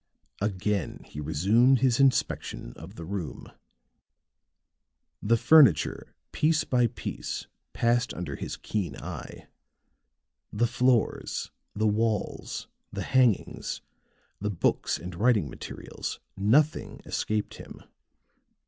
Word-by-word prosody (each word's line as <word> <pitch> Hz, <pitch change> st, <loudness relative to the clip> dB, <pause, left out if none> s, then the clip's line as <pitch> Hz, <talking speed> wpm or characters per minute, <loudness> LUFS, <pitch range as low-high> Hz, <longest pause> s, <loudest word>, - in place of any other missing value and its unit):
Again 100 Hz, -1 st, -1 dB
he 75 Hz, -, -7 dB
resumed 105 Hz, -, +4 dB
his 130 Hz, -2 st, +3 dB
inspection 130 Hz, -, +1 dB
of 85 Hz, +7 st, -11 dB
the 85 Hz, -, -7 dB
room. 90 Hz, -6 st, -5 dB, 1.7 s
The 115 Hz, +3 st, +3 dB
furniture, 135 Hz, -, +5 dB, 0.2 s
piece 155 Hz, 0 st, +2 dB
by 125 Hz, -2 st, +3 dB
piece, -, -, -5 dB, 0.3 s
passed 120 Hz, 0 st, +1 dB
under 85 Hz, -6 st, -5 dB
his -, -, -5 dB
keen 95 Hz, -8 st, -3 dB
eye; -, -, -8 dB, 1.0 s
the 115 Hz, +3 st, +2 dB
floor, 125 Hz, 0 st, +2 dB, 0.5 s
the 110 Hz, +1 st, +1 dB
walls, 110 Hz, -1 st, -1 dB, 0.2 s
the -, -, -4 dB
hangings, 125 Hz, -6 st, +1 dB, 0.6 s
the 105 Hz, -, -2 dB
books 95 Hz, -5 st, +1 dB
and 90 Hz, +2 st, -7 dB
writing 105 Hz, -, +3 dB
materials -, -, -6 dB, 0.2 s
nothing 130 Hz, +11 st, +2 dB
escaped 105 Hz, -1 st, -2 dB
him. -, -, -11 dB
110 Hz, 105 wpm, -28 LUFS, 95-125 Hz, 1.7 s, furniture